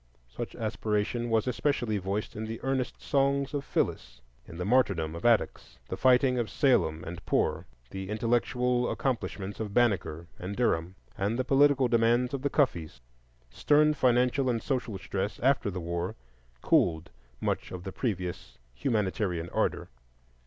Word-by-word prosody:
Such 115 - -7
aspiration 110 +1 -1
was 110 -1 +2
especially 125 -4 0
voiced 100 +3 -3
in 110 - -4
the 110 +1 -5
earnest 135 -1 -1
songs 140 0 +1
of 145 -1 -2
Phyllis, - - -2 0.3
in 85 - -10
the 90 - -3
martyrdom 100 -9 +2
of 85 - -7
Attucks, 105 - +1
the - - -2
fighting 125 0 +4
of 115 - -1
Salem 80 - +2
and 85 +1 -7
Poor, - - 0 0.2
the 95 0 -6
intellectual 120 +2 +1
accomplishments 105 -6 -3
of 105 -2 -4
Banneker 95 -9 +1
and 95 +3 -5
Derham, 90 -7 0 0.2
and 105 +4 0
the 130 - +1
political 135 -1 +4
demands 120 +2 +2
of 135 - -2
the 140 - 0
Cuffes. 85 - 0 0.5
Stern 150 - +3
financial 125 0 +2
and 115 -2 -1
social 125 -6 -2
stress 95 +1 -3
after 130 -4 +2
the 95 -1 -4
war 85 +4 -3 0.5
cooled 80 -2 +2 0.3
much - - -2
of 90 -1 -6
the 95 - -5
previous 90 - -4 0.2
humanitarian 95 - -1
ardor. - - 0
115 Hz, 150 wpm, -29 LUFS, 95-125 Hz, 0.5 s, fighting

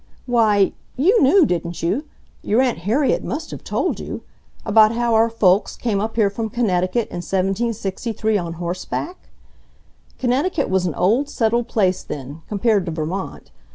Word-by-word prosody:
"Why 215 -5 +3 0.3
you 380 - +4
knew, 310 +6 +6
didn't 170 -5 -3
you—your 225 - -2
Aunt 255 -7 +1
Harriet 235 - +1
must 305 +5 -5
have - - -8
told - - -1
you—about 215 +1 0
how 235 0 0
our 225 +1 +4
folks 200 -3 +2
came 210 -5 -1
up 220 +1 -3
here 210 -3 +2
from 220 +2 -3
Connecticut 205 -1 0
in - - -6
1763, 200 +3 -1
on 170 -4 -2
horseback! 180 - -5 0.9
Connecticut 275 - 0
was 190 -1 +1
an 160 - -3
old 235 +11 +2
settled 235 -2 0
place 190 -6 +1
then, 140 +3 -7
compared 205 -2 +1
to - - -2
Vermont. 160 +5 -5
215 Hz, 145 wpm, -21 LUFS, 185-240 Hz, 0.9 s, knew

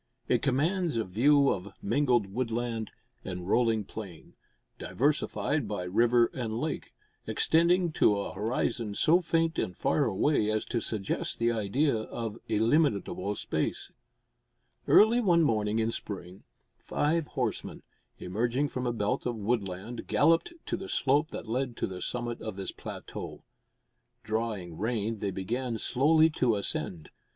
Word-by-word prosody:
It - - +2
commands 160 +3 +1
a 115 - +1
view 140 +9 +4
of 95 +1 -3
mingled 120 0 +2
woodland 115 -2 -2 0.3
and 90 -1 -6
rolling 115 0 +2
plain, 95 -5 -9 0.5
diversified 145 -1 0
by 100 -3 -3
river 115 +6 +3
and 115 -3 -3
lake, 155 +2 -4 0.3
extending 170 +1 +3
to 105 -8 +3
a 100 - -4
horizon 110 +1 -1
so 170 - +4
faint 165 0 +1
and 90 - -3
far 145 - +2
away 110 +2 +2
as 110 0 0
to 120 -2 -2
suggest 105 -3 -2
the 115 0 +2
idea 115 +6 +1
of 110 0 -5
illimitable 110 - +1
space. - - -2 1.0
Early 220 +3 +6
one 175 -6 +4
morning 110 -5 +1
in 115 0 +1
spring, 95 -4 -7 0.3
five 155 +1 0
horsemen, 120 -5 -2 0.3
emerging 120 +9 -1
from 125 -1 -3
a 120 - 0
belt 115 +4 -1
of 120 - -2
woodland, 105 0 -3
galloped 165 - +3
to - - -2
the 190 +1 -8
slope 145 +4 +2
that - - -7
led 125 +1 -2
to - - 0
the 90 -1 -6
summit 120 -1 -3
of 110 -3 -5
this 95 -1 -4
plateau. - - -8 0.8
Drawing 110 -7 -3
rein, 110 0 -1
they 100 - -1
began 115 +6 -3
slowly 155 +7 +3
to 125 -6 +2
ascend. 90 -5 -3
115 Hz, 140 wpm, -29 LUFS, 105-140 Hz, 1.0 s, Early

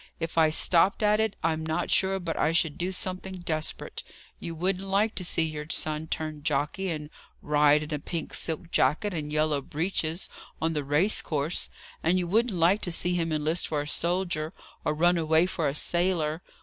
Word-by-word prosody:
If 165 0 -4
I 160 -1 +5
stopped 175 +6 +4
at 210 0 +4
it, 220 -2 0
I'm 160 -1 0
not 160 +2 -2
sure 195 0 +3
but 170 -3 -3
I 160 - +1
should 160 -2 +2
do 180 +2 -2
something 185 0 -4
desperate. 155 -2 -2 0.4
You 165 - -6
wouldn't 185 +3 -1
like 205 +3 +2
to 185 - -3
see 170 -1 +1
your 150 -2 -4
son 155 0 0
turn 155 -1 -4
jockey, 150 +6 -1
and 150 -2 -5 0.3
ride 150 0 +4
in 150 +1 -6
a 150 - -1
pink 165 +2 -5
silk 165 +1 -3
jacket 155 +10 +2
and 150 -3 -4
yellow 150 -1 +1
breeches 160 +3 -2 0.3
on 165 +1 0
the 150 -2 -2
race 150 +9 +3
course; 150 +2 -2 0.3
and 175 +3 +2
you 180 -1 -1
wouldn't 220 +3 +1
like 175 +5 +3
to 175 - -3
see 175 +1 +1
him 165 -2 -1
enlist 155 +2 0
for 150 -2 -1
a 145 - -6
soldier, 170 0 -1 0.3
or 150 - 0
run 175 +2 +3
away 160 +1 +3
for 170 -4 -1
a 140 - -2
sailor! 170 -2 +2
165 Hz, 195 wpm, -27 LUFS, 155-180 Hz, 0.4 s, I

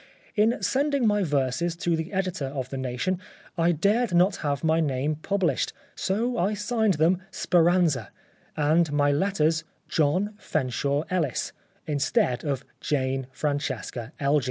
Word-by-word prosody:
In 220 +3 +3
sending 280 -1 +1
my 210 -1 +3
verses 145 +1 0
to 170 0 0
the 160 +1 -4
editor 185 -7 -1
of 135 -2 -4
The 135 - -3
Nation 130 +9 -1 0.4
I 170 -1 +3
dared 200 +5 +1
not 190 +3 +4
have 145 -2 -2
my 160 0 +3
name 145 0 0
published, 195 +2 0 0.2
so 230 +5 -1
I 200 +4 +1
signed 220 -1 +1
them 170 +4 +2
' - - -36
Speranza,' 170 - +3 0.5
and 155 +2 +3
my 145 -1 +3
letters 160 -1 +1
* - - -42
John 180 +8 +2
Fenshaw 140 - -1
Ellis,' 160 -9 -1 0.3
instead 140 -4 +1
of 140 -2 -2
Jane 135 -2 -1
Francesca 130 -4 -3
Elgee." 145 +1 +3
160 Hz, 145 wpm, -26 LUFS, 140-190 Hz, 0.5 s, not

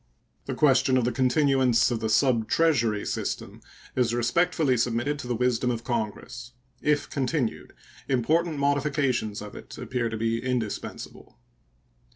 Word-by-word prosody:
The - - -3
question 135 -2 +4
of 125 - +1
the 125 - +1
continuance 130 -2 +3
of 120 - -1
the 110 -1 -2
subtreasury 115 -1 +2
system - - -4 0.3
is 120 -2 +1
respectfully 130 +3 +2
submitted 120 +5 0
to 125 - -6
the 120 - -1
wisdom 125 +1 +1
of 120 -1 -2
Congress. 120 +2 -4 0.3
If 150 -1 +1
continued, 135 -3 -2 0.4
important 155 +6 +1
modifications 140 -6 0
of 105 - -9
it - - -10
appear 125 -1 -2
to 110 - -4
be 115 +1 -1
indispensable. 125 -5 -4
125 Hz, 135 wpm, -26 LUFS, 115-140 Hz, 0.4 s, question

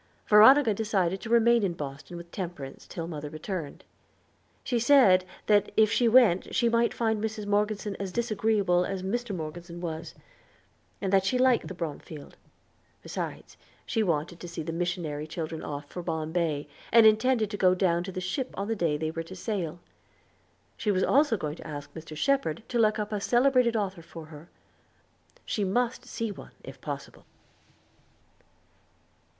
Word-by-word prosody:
Veronica 220 +3 +7
decided 195 -3 0
to - - -7
remain 235 0 +5
in 190 -4 0
Boston 145 +3 -7
with 170 0 -11
Temperance 170 -8 -7
till 165 -2 -5
mother 150 -3 -6
returned. 155 0 -6 0.8
She 245 -2 0
said 230 -8 +5 0.2
that 205 -1 +3
if 215 -1 +5
she 240 - +3
went 225 -7 +4
she 235 - +3
might 235 0 +2
find 220 -2 -1
Mrs. 220 -1 -3
Morgeson 205 0 0
as 195 -2 -4
disagreeable 210 -5 +1
as 190 0 -4
Mr. 220 +2 -2
Morgeson 170 +1 -7
was; 165 -2 -5 0.9
that 195 -1 +2
she 250 +6 +1
liked 255 -1 +3
the 185 - -7
Bromfield; 155 -2 -7 0.7
besides, - - -6 0.3
she 225 - 0
wanted 170 -3 -1
to 175 - -8
see 170 -1 -5
the 165 - -4
missionary 165 -4 -3
children 160 0 -5
off 145 -1 -5
for 180 - -7
Bombay, 160 -2 -2 0.2
and 230 -1 +7
intended 220 0 +3
to - - -3
go 185 -2 +4
down 175 -2 +1
to 190 - -6
the 185 - -4
ship 190 +9 -3
on 200 +1 -2
the 225 - -1
day 165 -7 0
they 155 +1 -2
were 165 - -4
to 165 +3 -9
sail. 180 -5 -3 1.0
She 215 - -2
was 190 -2 +2
also 280 -4 +3
going 150 -2 -4
to - - -10
ask 145 -2 -7
Mr. 160 -1 -9
Shepherd 220 - 0
to 240 - 0
look 215 -1 +3
up 210 0 -3
a 210 -1 -2
celebrated 250 0 +3
author 195 -5 -2
for 165 -1 -10
her. 150 +3 -12 1.0
She 210 - -1
must 245 +5 0
see 230 -3 -4
one - - -11
if - - -11
possible. - - -7
190 Hz, 165 wpm, -28 LUFS, 165-220 Hz, 1.0 s, Veronica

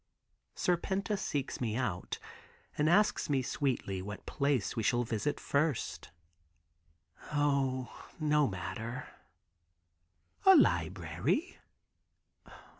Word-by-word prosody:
Serpenta 190 +4 0
seeks 145 -11 -3
me 110 -3 -1
out, 100 -8 -2 0.6
and 150 +1 +2
asks 205 -1 +3
me 135 -3 +2
sweetly 125 -8 -1
what 105 +2 -7
place 140 -6 0
we 115 - 0
shall 120 +3 +2
visit 115 +4 -2
first. 145 -2 -1 1.2
"O, 140 -3 0
no 150 -2 +3
matter." 95 +6 -5 1.4
"A 385 0 +9
library?" 360 0 +1
140 Hz, 90 wpm, -32 LUFS, 115-155 Hz, 1.4 s, A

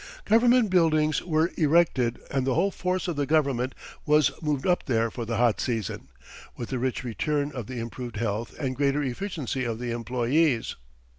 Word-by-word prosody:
Government 235 -1 +4
buildings 155 -4 +3
were 160 0 +1
erected, 150 -7 +3
and 135 -2 0
the 130 - +2
whole 195 +5 +2
force 185 0 -2
of 170 -4 -3
the 145 -1 0
government 135 -5 +1 0.3
was 150 -1 +4
moved 150 -4 -1
up 180 -2 +1
there 115 -3 +1
for 120 0 -5
the 115 0 -2
hot 120 -2 +2
season, 115 -5 -3 0.5
with 120 - -5
the 130 - -2
rich 130 +1 -2
return 145 +5 -1
of 125 -6 -6
the 130 - -6
improved 120 +1 -6
health 110 +1 -3
and 130 -3 -2
greater 140 +2 +1
efficiency 135 - -3
of 115 -2 -2
the 120 0 -4
employees. 120 +3 0
135 Hz, 175 wpm, -26 LUFS, 120-155 Hz, 0.5 s, Government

